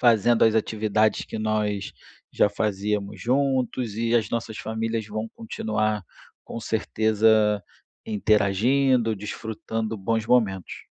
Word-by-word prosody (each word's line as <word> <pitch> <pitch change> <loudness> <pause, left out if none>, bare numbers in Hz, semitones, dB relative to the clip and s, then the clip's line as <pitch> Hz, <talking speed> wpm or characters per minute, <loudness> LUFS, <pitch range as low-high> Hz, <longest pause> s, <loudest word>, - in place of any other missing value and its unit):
fazendo 120 -1 +4
as 110 -1 +4
atividades 110 0 +1
que - - -6
nós 105 -2 -1 0.4
já - - +3
fazíamos 105 -1 -2
juntos 130 -3 0
e 115 +1 0
as 115 -2 +2
nossas 115 -2 -3
famílias 110 0 -3
vão 110 +1 -4
continuar, 110 -2 -2 0.4
com 115 - -7
certeza, 110 -1 +2 0.4
interagindo, 110 +4 +2
desfrutando 110 +2 -4
bons 110 +3 -1
momentos. 100 -8 +1
110 Hz, 110 wpm, -25 LUFS, 105-115 Hz, 0.4 s, fazendo